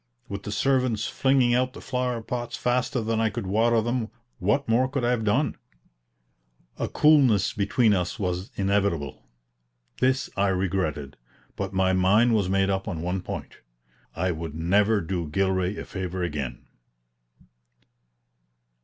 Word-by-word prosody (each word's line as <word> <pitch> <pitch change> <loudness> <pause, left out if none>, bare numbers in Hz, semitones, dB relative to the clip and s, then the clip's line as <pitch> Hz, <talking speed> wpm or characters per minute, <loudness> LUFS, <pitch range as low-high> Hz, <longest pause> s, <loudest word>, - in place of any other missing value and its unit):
With 100 -2 -5
the 105 - -6
servants 125 -1 +1
flinging 130 -3 +2
out 130 +1 +1
the - - -10
flower 125 -3 -2
pots 120 +1 -4
faster 125 +1 0
than 110 0 -1
I 110 - +2
could 110 0 -5
water 115 +4 +2
them, 120 -1 -1 0.3
what 105 +9 +1
more 120 +3 +3
could 135 -2 -1
I 120 - +2
have 120 -2 0
done? 115 +8 +1 1.2
A - - -1
coolness 130 - +4
between 105 +2 +2
us 90 +3 -1
was 90 -2 -3
inevitable. 100 -7 0 0.8
This 130 +1 +2
I 100 +1 +2
regretted, 90 -7 -1 0.4
but - - -4
my 95 -1 +2
mind 105 +6 +4
was 100 -4 +1
made 95 0 +2
up 95 0 -2
on 80 -2 -4
one 90 +2 -2
point: - - -7 0.6
I 90 +2 0
would 80 -2 -5
never 100 +6 +2
do 85 -1 -3
Gilray 95 +3 0
a - - -6
favor 95 -1 -4
again. 70 -7 -4
100 Hz, 145 wpm, -25 LUFS, 95-120 Hz, 1.2 s, coolness